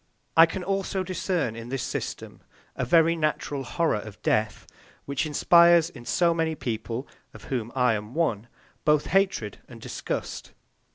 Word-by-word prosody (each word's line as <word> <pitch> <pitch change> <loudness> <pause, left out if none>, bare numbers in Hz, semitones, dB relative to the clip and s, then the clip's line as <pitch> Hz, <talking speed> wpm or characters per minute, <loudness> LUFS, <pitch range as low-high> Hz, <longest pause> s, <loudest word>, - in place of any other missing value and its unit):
I 165 +1 +8
can 180 +3 -5
also 195 0 -1
discern 180 - -2
in 115 +1 -8
this 135 -1 -3
system - - -5 0.3
a - - -2
very 165 +5 +4
natural 150 -3 -2
horror 145 -1 0
of 105 -1 -10
death, 110 0 0 0.4
which 140 +3 -1
inspires 170 +2 +5
in 120 -6 -12
so 170 +6 +2
many 160 -1 -1
people, 120 0 -4 0.3
of - - -12
whom 120 -2 -2
I 125 -3 +3
am 105 +3 -5
one, 120 -10 0 0.4
both 150 -1 +3
hatred 190 - 0
and - - -12
disgust. - - -5
150 Hz, 155 wpm, -26 LUFS, 120-170 Hz, 0.4 s, I